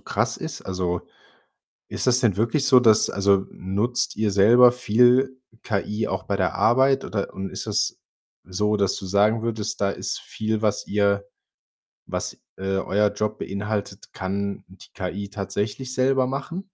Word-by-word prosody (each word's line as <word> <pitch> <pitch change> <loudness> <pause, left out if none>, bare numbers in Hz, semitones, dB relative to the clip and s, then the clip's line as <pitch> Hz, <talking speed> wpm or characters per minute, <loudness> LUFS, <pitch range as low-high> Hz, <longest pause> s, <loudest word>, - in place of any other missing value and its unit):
krass - - -1
ist. - - -7
Also, 90 -2 -2 0.9
ist - - -3
das 125 0 +5
denn 105 -6 +2
wirklich 120 +6 +1
so, 130 -2 +7
dass 110 -3 +4
also, 100 -1 +2
nutzt 105 +6 -1
ihr 105 -2 0
selber 120 +5 +6
viel 125 +2 +3 0.3
KI 105 +1 -2
auch 95 - -3
bei 100 - -2
der 95 - 0
Arbeit 130 +3 +3
oder 100 -2 -3
und 95 0 -5
ist - - -6
das - - 0 0.5
so, 105 +3 0
dass 100 -2 +1
du 95 - -7
sagen 105 +4 +2
würdest, 110 -3 -3
da 100 - +2
ist - - -4
viel, 110 0 -3
was 105 -2 0
ihr 100 -1 +1 0.8
was, - - -4 0.2
äh, 95 - -9 0.2
euer 105 +2 +1
Job 105 +1 -3
beinhaltet 100 0 -4
kann 100 +1 -4
die - - -17
KI 100 +1 -5
tatsächlich 105 +6 -4
selber 130 0 +2
machen? 140 +7 -4
105 Hz, 160 wpm, -23 LUFS, 100-120 Hz, 0.9 s, so